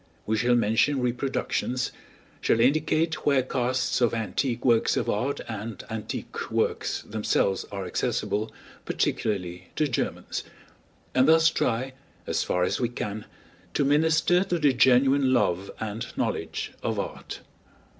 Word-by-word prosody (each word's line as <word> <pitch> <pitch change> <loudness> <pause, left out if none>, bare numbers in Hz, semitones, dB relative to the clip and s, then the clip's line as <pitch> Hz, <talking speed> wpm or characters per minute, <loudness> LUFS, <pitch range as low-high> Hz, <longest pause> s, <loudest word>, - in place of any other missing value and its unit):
We 110 - +1
shall 120 +2 +3
mention 115 +5 +2
reproductions, 125 0 -1 0.5
shall 115 - +2
indicate 155 +5 +2
where 140 -3 +3
casts 130 0 0
of 120 -1 +3
antique 115 +3 -2
works 115 -3 +3
of - - -1
art 125 +7 -1
and 110 -1 -6
antique 110 -1 -5
works - - -1
themselves 105 -2 0
are 100 -2 -4
accessible, 105 +4 -1 0.3
particularly 90 -3 -2
to 155 - +2
Germans; 125 - -3 0.7
and 130 +2 +4
thus 160 +1 +6
try, 125 +3 -1 0.3
as - - 0
far 90 - 0
as - - 0
we 120 - +1
can, 105 -3 -5 0.5
to 140 - +2
minister 160 +5 +3
to 180 -3 -1
the 145 -4 +3
genuine 130 +2 +4
love 95 -6 +1
and 110 +1 -4
knowledge - - -2
of - - -2
art. - - -6
120 Hz, 135 wpm, -26 LUFS, 110-140 Hz, 0.7 s, thus